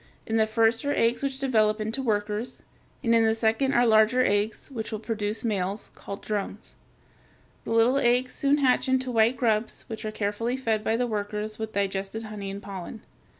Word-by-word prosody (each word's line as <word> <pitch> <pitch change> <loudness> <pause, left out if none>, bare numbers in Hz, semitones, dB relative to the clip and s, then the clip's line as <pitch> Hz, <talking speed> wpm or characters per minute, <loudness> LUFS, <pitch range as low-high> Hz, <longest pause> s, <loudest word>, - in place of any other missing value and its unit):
In 225 - 0
the 220 0 +3
first 225 +1 +2
are 285 0 0
eggs 230 +1 +2
which 275 -1 -2
develop 220 -5 +2
into 220 +5 -2
workers, 210 -1 -2 0.4
and 230 - +3
in 230 -1 +5
the 220 0 +3
second 225 +5 +1
are 240 +1 +5
larger 225 +3 +4
eggs 205 +6 -1
which 225 -4 -5
will 215 - -2
produce 215 -1 -3
males, 200 -2 -2
called 200 - -8
drones. 205 0 -4 0.9
The - - -4
little 230 +4 +4
eggs 250 0 +2
soon 280 +1 +2
hatch 265 -2 +2
into 260 -1 +1
white 230 +2 +3
grubs 225 -2 0
which 220 -1 -7
are 215 - -3
carefully 215 +4 -2
fed 225 -5 -1
by 225 +1 +1
the 250 - +1
workers 210 -1 -3
with 220 0 -4
digested 200 +2 -2
honey 210 -2 -6
and 200 +1 -7
pollen. 195 +2 -7
220 Hz, 190 wpm, -26 LUFS, 210-240 Hz, 0.9 s, in